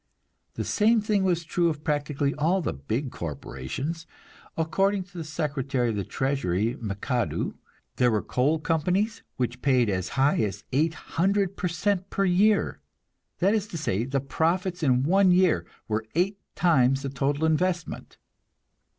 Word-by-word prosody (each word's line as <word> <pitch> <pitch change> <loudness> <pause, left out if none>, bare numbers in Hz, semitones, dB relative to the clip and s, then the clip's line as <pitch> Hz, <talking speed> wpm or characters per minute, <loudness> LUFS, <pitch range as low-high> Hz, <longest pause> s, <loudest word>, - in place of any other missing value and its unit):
The - - -2
same 225 +2 +3
thing 210 -2 +1
was 175 -3 +1
true 170 +1 +1
of 150 -2 -5
practically 145 -1 0
all 165 +6 +1
the - - -1
big 110 - -3
corporations. 85 - -5 0.5
According 195 +5 +1
to 180 -2 -8
Secretary 140 -5 -1
of 110 - -2
the 100 - -1
Treasury 115 -5 -1
McAdoo, 115 +4 -2 0.4
there 125 -1 +4
were 110 -3 0
coal 140 +6 +1
companies 180 +8 0 0.2
which 125 0 -2
paid 125 -6 +3
as 95 -1 -2
high 135 +2 +4
as 105 -2 -2
eight 155 +5 +1 0.3
hundred 195 0 +2
per 185 - -1
cent 190 +2 -1
per 195 - 0
year; 200 +3 +3 0.6
that 195 +4 +3
is 215 -2 0
to 175 - -6
say, 115 -9 -1
the 135 +2 -1
profits 175 +6 -1
in 130 -4 +3
one 190 +5 +4
year 180 -1 +3 0.2
were 110 0 -2
eight 195 +4 +1 0.2
times 135 -6 +3
the 140 - -2
total 140 +3 0
investment. 170 +2 -1
155 Hz, 150 wpm, -26 LUFS, 125-180 Hz, 0.6 s, there